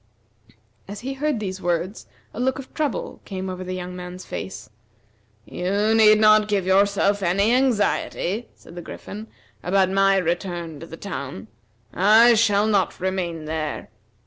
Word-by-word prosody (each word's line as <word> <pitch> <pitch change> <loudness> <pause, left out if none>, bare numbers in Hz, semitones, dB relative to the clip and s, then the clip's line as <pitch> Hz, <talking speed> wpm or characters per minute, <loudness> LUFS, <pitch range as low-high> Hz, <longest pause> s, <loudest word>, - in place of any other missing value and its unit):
As 200 +1 -8
he 265 +2 -4
heard 290 -2 -1
these 190 -2 -5
words, 175 +4 -2 0.3
a - - -7
look 260 +1 0
of 270 -1 -10
trouble 300 -2 -3
came 190 -1 -5
over 185 0 -6
the 185 0 -5
young 180 0 -6
man's 180 0 -8
face. 190 - -7 0.8
"You 200 - 0
need 215 -1 +6
not 215 0 +5
give 200 -3 0
yourself 200 +1 +2
any 200 +5 +2
anxiety," 235 -4 0
said - - -16
the 175 - -7
Griffin, 210 +5 -9 0.3
"about 190 +1 +2
my 195 0 +4
return 175 -3 -3
to 165 - -9
the 165 - -10
town. 140 - -7 0.4
I 220 +5 +6
shall 210 -2 +3
not 205 -3 +1
remain 180 -4 -3
there. 155 -1 -4
195 Hz, 150 wpm, -23 LUFS, 180-215 Hz, 0.8 s, need